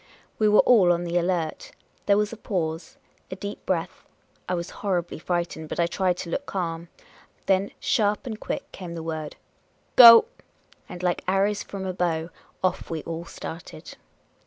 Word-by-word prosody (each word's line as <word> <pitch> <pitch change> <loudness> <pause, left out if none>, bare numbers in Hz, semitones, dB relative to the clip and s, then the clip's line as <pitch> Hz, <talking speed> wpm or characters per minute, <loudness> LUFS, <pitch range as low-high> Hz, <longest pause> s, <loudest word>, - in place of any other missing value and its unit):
We 215 -1 +4
were 210 - +6
all 200 -8 +5
on 175 0 0
the 175 0 0
alert. 170 -3 -2 0.3
There 200 0 +5
was 210 +1 0
a - - -5
pause; 165 -6 -4 0.3
a - - -5
deep 200 +2 -7
breath. 170 -3 -2 0.5
I 180 - +1
was 170 0 -5
horribly 180 -5 -2
frightened, 170 -2 -3
but - - -5
I 170 - +4
tried 180 +1 0
to 170 - -6
look 280 - -3
calm. 170 -3 -4 0.6
Then 195 +1 +2
sharp 210 -7 +1
and 220 -4 -5
quick - - -5
came 175 -3 -8
the 165 - -6
word, 160 -2 -5 0.3
" - - -40
Go! 235 - +11 0.3
" - - -32
And 180 - -8
like 180 -1 0
arrows 200 +2 +1
from 195 -1 -7
a 185 - -3
bow, 170 -2 -1 0.3
off 185 0 -1
we 160 -2 -4
all 165 +1 -5
started. 160 - -9
180 Hz, 180 wpm, -25 LUFS, 170-200 Hz, 0.6 s, Go